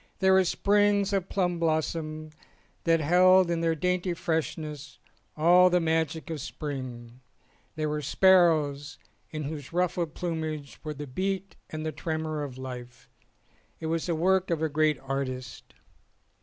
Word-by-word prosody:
There 190 Hz, 0 st, +4 dB
were 190 Hz, 0 st, +6 dB
sprigs 205 Hz, +1 st, +2 dB
of 195 Hz, -2 st, -1 dB
plum 175 Hz, -3 st, 0 dB
blossom 155 Hz, -1 st, -2 dB, 0.5 s
that 165 Hz, -1 st, +3 dB
held 180 Hz, +3 st, +5 dB
in 170 Hz, -1 st, 0 dB
their 165 Hz, -1 st, +1 dB
dainty 180 Hz, +2 st, -1 dB
freshness 150 Hz, -4 st, -3 dB, 0.4 s
all 175 Hz, +3 st, +6 dB
the 180 Hz, 0 st, +3 dB
magic 160 Hz, -1 st, -1 dB
of 160 Hz, -, -3 dB
the -, -, -9 dB
spring; 130 Hz, -4 st, -7 dB, 0.5 s
there 155 Hz, -1 st, -1 dB
were 150 Hz, 0 st, -2 dB
sparrows 155 Hz, -4 st, +3 dB, 0.3 s
in 155 Hz, -1 st, -5 dB
whose 145 Hz, -1 st, -6 dB
ruffled 175 Hz, -2 st, -1 dB
plumage 155 Hz, -4 st, -4 dB
were 155 Hz, -1 st, -5 dB
the 145 Hz, +1 st, -6 dB
beat 190 Hz, +7 st, -3 dB
and 155 Hz, 0 st, -5 dB
the 155 Hz, -, -1 dB
tremor 155 Hz, +1 st, -3 dB
of 130 Hz, -3 st, -7 dB
life. 125 Hz, -1 st, -9 dB, 0.7 s
It -, -, -6 dB
was 165 Hz, +1 st, -2 dB
the 170 Hz, -, 0 dB
work 190 Hz, +3 st, +2 dB
of 165 Hz, -2 st, 0 dB
a 160 Hz, -, +1 dB
great 155 Hz, 0 st, +2 dB
artist. 130 Hz, -2 st, -5 dB
160 Hz, 150 wpm, -27 LUFS, 145-180 Hz, 0.7 s, were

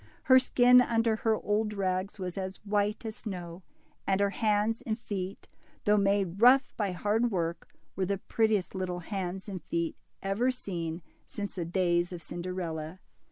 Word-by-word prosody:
Her 260 Hz, 0 st, +7 dB
skin, 250 Hz, -1 st, +6 dB
under 230 Hz, -2 st, +2 dB
her 225 Hz, -2 st, +2 dB
old 210 Hz, 0 st, 0 dB
rags, 190 Hz, 0 st, -1 dB
was 185 Hz, -2 st, -4 dB
as 190 Hz, -1 st, -4 dB
white 210 Hz, +2 st, 0 dB
as 220 Hz, -1 st, -5 dB
snow; 180 Hz, -4 st, -6 dB, 0.5 s
and 195 Hz, 0 st, +2 dB
her 200 Hz, 0 st, +2 dB
hands 215 Hz, +1 st, +1 dB
and 225 Hz, -4 st, -2 dB
feet, 200 Hz, -4 st, -5 dB, 0.4 s
though 210 Hz, -, +4 dB
made 200 Hz, -2 st, +1 dB
rough 260 Hz, +3 st, +6 dB
by 205 Hz, -3 st, -1 dB
hard 210 Hz, +6 st, +1 dB
work, 170 Hz, -4 st, -3 dB, 0.2 s
were 190 Hz, -1 st, -1 dB
the 200 Hz, 0 st, 0 dB
prettiest 215 Hz, -1 st, 0 dB
little 180 Hz, -2 st, -3 dB
hands 190 Hz, 0 st, -4 dB
and 190 Hz, -4 st, -5 dB
feet 170 Hz, 0 st, -2 dB, 0.3 s
ever 200 Hz, +6 st, +1 dB
seen 170 Hz, -9 st, -4 dB, 0.2 s
since 205 Hz, -1 st, -5 dB
the 175 Hz, -3 st, -3 dB
days 175 Hz, 0 st, +1 dB
of 175 Hz, -, -5 dB
Cinderella. 175 Hz, -2 st, -5 dB
195 Hz, 160 wpm, -30 LUFS, 180-220 Hz, 0.5 s, Her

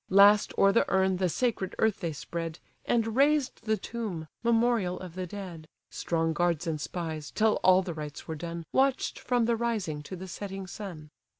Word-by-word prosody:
Last 200 Hz, +2 st, +6 dB
o'er 195 Hz, -, +6 dB
the 230 Hz, -, +4 dB
urn 190 Hz, -1 st, +3 dB
the 185 Hz, -1 st, +1 dB
sacred 205 Hz, -2 st, -1 dB
earth 220 Hz, -2 st, +2 dB
they 170 Hz, -, -2 dB
spread, 165 Hz, +2 st, -5 dB, 0.3 s
And 225 Hz, -2 st, +1 dB
raised 280 Hz, -1 st, +2 dB
the 220 Hz, 0 st, +2 dB
tomb, 210 Hz, -11 st, -5 dB
memorial 230 Hz, -5 st, +2 dB
of 180 Hz, -3 st, -8 dB
the 185 Hz, 0 st, -4 dB
dead. 175 Hz, -5 st, -8 dB, 0.2 s
(Strong 165 Hz, -1 st, 0 dB
guards 175 Hz, 0 st, +1 dB
and 155 Hz, -3 st, -2 dB
spies, 160 Hz, -4 st, -4 dB
till 215 Hz, 0 st, +2 dB
all 185 Hz, 0 st, +6 dB
the 175 Hz, -2 st, -4 dB
rites 150 Hz, -2 st, -7 dB
were 160 Hz, -, -3 dB
done, 170 Hz, +1 st, -6 dB
Watch'd 270 Hz, 0 st, +1 dB
from 245 Hz, -2 st, +1 dB
the 235 Hz, 0 st, +2 dB
rising 215 Hz, -10 st, -2 dB
to 165 Hz, +6 st, -7 dB
the 185 Hz, +1 st, -8 dB
setting 195 Hz, +1 st, -6 dB
sun.) 175 Hz, -6 st, -8 dB
190 Hz, 185 wpm, -29 LUFS, 165-220 Hz, 0.3 s, Last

